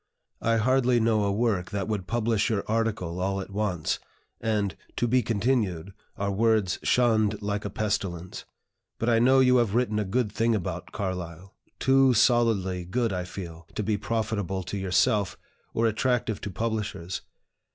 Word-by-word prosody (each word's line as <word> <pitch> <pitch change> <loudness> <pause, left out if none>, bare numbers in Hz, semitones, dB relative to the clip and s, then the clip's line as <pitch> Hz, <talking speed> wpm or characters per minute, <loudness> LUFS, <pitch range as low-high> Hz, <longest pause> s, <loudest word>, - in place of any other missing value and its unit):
I 115 0 +2
hardly 125 +1 +3
know 110 -2 +2
a 100 - +1
work 100 -4 0
that 100 -1 -3
would 105 -4 -3
publish 115 -2 +1
your 105 -3 0
article 110 -6 -1
all 95 +1 0
at 95 - -7
once, 95 -6 -1 0.4
and 105 -3 0 0.2
'to 120 - +1
be 125 +2 +3
continued' 105 -5 0 0.2
are 100 0 -1
words 105 -2 +2
shunned 110 -4 +2
like 105 0 -2
a - - -2
pestilence. 95 -4 -3 0.5
But 115 - 0
I 115 -1 +4
know 130 +3 +5
you 125 -1 +5
have 115 -4 +1
written 120 -3 +1
a - - +1
good 105 +3 0
thing 115 +1 +1
about 90 -2 -4
Carlyle, 90 -2 -5 0.2
too 135 -1 +4
solidly 105 -7 +2
good, 115 +4 -1
I 90 -1 -2
fear, 85 -3 -8
to 105 - -1
be 105 +1 +1
profitable 105 -3 -2
to 100 - -5
yourself, 95 0 +1 0.3
or 115 - 0
attractive 115 -1 0
to - - -4
publishers. 100 -4 -3
105 Hz, 160 wpm, -27 LUFS, 95-115 Hz, 0.5 s, know